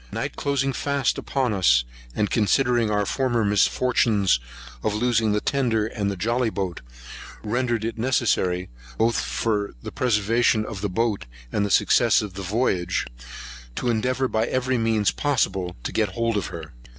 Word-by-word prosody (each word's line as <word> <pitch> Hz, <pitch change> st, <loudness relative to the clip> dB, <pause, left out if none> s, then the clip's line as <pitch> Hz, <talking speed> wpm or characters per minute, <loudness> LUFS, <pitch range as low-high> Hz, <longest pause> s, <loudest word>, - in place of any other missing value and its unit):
Night -, -, -3 dB
closing 140 Hz, -1 st, 0 dB
fast 140 Hz, +1 st, 0 dB
upon 130 Hz, -5 st, -1 dB
us, 60 Hz, -11 st, +4 dB, 0.3 s
and 105 Hz, -, 0 dB
considering 120 Hz, +1 st, +2 dB
our 105 Hz, -1 st, +1 dB
former 120 Hz, -2 st, 0 dB
misfortunes 105 Hz, -, +2 dB, 0.4 s
of 105 Hz, -, -1 dB
losing 115 Hz, -1 st, +2 dB
the 105 Hz, -, +2 dB
tender 115 Hz, -4 st, 0 dB
and 100 Hz, -3 st, -2 dB
jolly 115 Hz, +4 st, +1 dB
boat, 95 Hz, -5 st, -4 dB, 0.6 s
rendered 120 Hz, 0 st, -1 dB
it 115 Hz, 0 st, -4 dB
necessary, 100 Hz, -7 st, +1 dB, 0.3 s
both 115 Hz, +1 st, +2 dB
for 105 Hz, -6 st, -1 dB
the -, -, -6 dB
preservation 115 Hz, -1 st, +2 dB
of 105 Hz, -4 st, -6 dB
the 105 Hz, -, -1 dB
boat, 105 Hz, -, -1 dB, 0.2 s
and 105 Hz, -, 0 dB
the 100 Hz, -, -1 dB
success 115 Hz, +3 st, +4 dB
of 100 Hz, -3 st, -6 dB
the 100 Hz, -, -6 dB
voyage, 95 Hz, -3 st, 0 dB, 0.7 s
to 125 Hz, -, -1 dB
endeavour, 125 Hz, +3 st, 0 dB
by 110 Hz, -1 st, 0 dB
every 130 Hz, 0 st, 0 dB, 0.4 s
possible 115 Hz, -10 st, 0 dB
means, 90 Hz, -, -8 dB
to -, -, -3 dB
get 110 Hz, -2 st, +1 dB
hold 115 Hz, +1 st, 0 dB
of 100 Hz, -5 st, -1 dB
her. -, -, -8 dB
110 Hz, 155 wpm, -24 LUFS, 100-125 Hz, 0.7 s, us